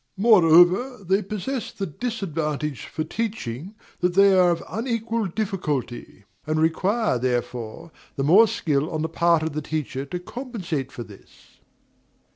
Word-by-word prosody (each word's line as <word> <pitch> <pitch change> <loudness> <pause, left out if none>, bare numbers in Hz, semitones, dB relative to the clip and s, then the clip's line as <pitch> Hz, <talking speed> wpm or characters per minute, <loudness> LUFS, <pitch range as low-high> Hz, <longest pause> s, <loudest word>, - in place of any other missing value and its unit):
Moreover, 195 +3 +5
they 190 +3 +2
possess 215 +5 -4
the 195 - -4
disadvantage 155 - -3
for 155 - -3
teaching 195 - -4 0.2
that 180 0 0
they 195 0 +6
are 180 -1 +5
of 170 -1 -1
unequal 230 0 -2
difficulty, 160 - -4 0.2
and 155 0 0
require, 185 - +1
therefore, 125 +4 -3 0.2
the 135 - -2
more 195 +10 +6
skill 150 -5 -1
on 155 -2 -3
the 160 - -2
part 170 0 +2
of 160 -1 -3
the 155 - -2
teacher 145 -3 -3
to 160 +6 -5
compensate 180 - -5
for 120 - -7
this. 105 -3 -18
170 Hz, 140 wpm, -24 LUFS, 150-210 Hz, 0.2 s, they